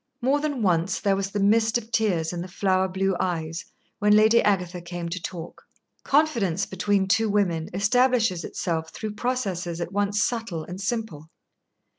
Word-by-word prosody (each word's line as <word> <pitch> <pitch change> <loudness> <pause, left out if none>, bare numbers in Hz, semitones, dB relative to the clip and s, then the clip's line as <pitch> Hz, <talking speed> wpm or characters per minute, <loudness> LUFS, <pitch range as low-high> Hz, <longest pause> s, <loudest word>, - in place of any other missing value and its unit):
More 270 +4 +2
than 290 -5 -2
once 180 0 +1
there 200 -1 +2
was 195 0 -2
the 205 - -3
mist 220 +3 +3
of 230 -1 -9
tears 180 -8 +1
in 175 - -4
the 180 - -6
flower 190 0 +1
blue 190 0 0
eyes 165 -2 -2 0.3
when 210 0 +4
Lady 220 +2 +5
Agatha 180 -3 0
came 175 0 -5
to 180 +1 -4
talk. 170 -1 -7 0.4
Confidence 230 - +2
between 195 0 0
two 225 +2 +2
women 180 -6 0
establishes 220 -1 +2
itself 160 -2 -3
through 215 -2 -5
processes 195 -8 -2
at 170 0 -4
once 205 0 0
subtle 225 -9 -2
and 180 +4 -8
simple. 200 -8 -3
195 Hz, 165 wpm, -25 LUFS, 175-220 Hz, 0.4 s, Lady